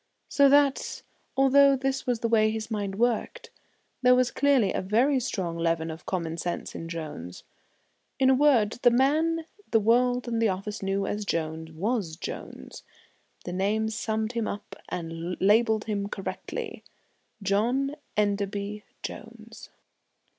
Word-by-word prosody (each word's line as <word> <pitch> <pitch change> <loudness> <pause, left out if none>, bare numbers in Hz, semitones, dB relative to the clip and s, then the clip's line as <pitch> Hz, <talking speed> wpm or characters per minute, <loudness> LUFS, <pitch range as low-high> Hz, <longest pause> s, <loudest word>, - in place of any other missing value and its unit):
So 280 -1 +5
that, 280 -1 +2 0.3
although 275 +1 +6
this 270 0 -2
was 245 -2 0
the 230 - +1
way 220 -1 +4
his 220 +1 -4
mind 200 -3 -2
worked, 240 - -1 0.5
there 250 0 +6
was 250 0 +2
clearly 270 -8 +3
a - - -1
very 245 +8 +2
strong 180 -8 -3
leaven 165 -1 0
of 160 - -10
common 170 -3 -2
sense 175 +1 -4
in 165 - -7
Jones. 150 - -7 0.7
In 265 - +3
a 265 - +6
word, 255 -6 +3
the 245 - +7
man 310 +6 +2 0.2
the 225 - +4
world 245 +3 +2
and 230 -1 -1
the 225 - +3
office 200 +3 -4
knew 195 0 -1
as 210 +1 -2
Jones 160 -3 -3
was 190 0 -2
Jones. 170 - -8 0.6
The 175 - -4
name 210 +4 0
summed 220 0 -2
him 230 -3 -2
up 205 - -6
and 165 +1 -5
labelled 220 +2 +3
him 205 -2 -2
correctly 195 - -5 0.6
John 245 +9 +1 0.2
Enderby 205 0 -1 0.2
Jones. 225 +1 -9
215 Hz, 145 wpm, -27 LUFS, 195-250 Hz, 0.7 s, the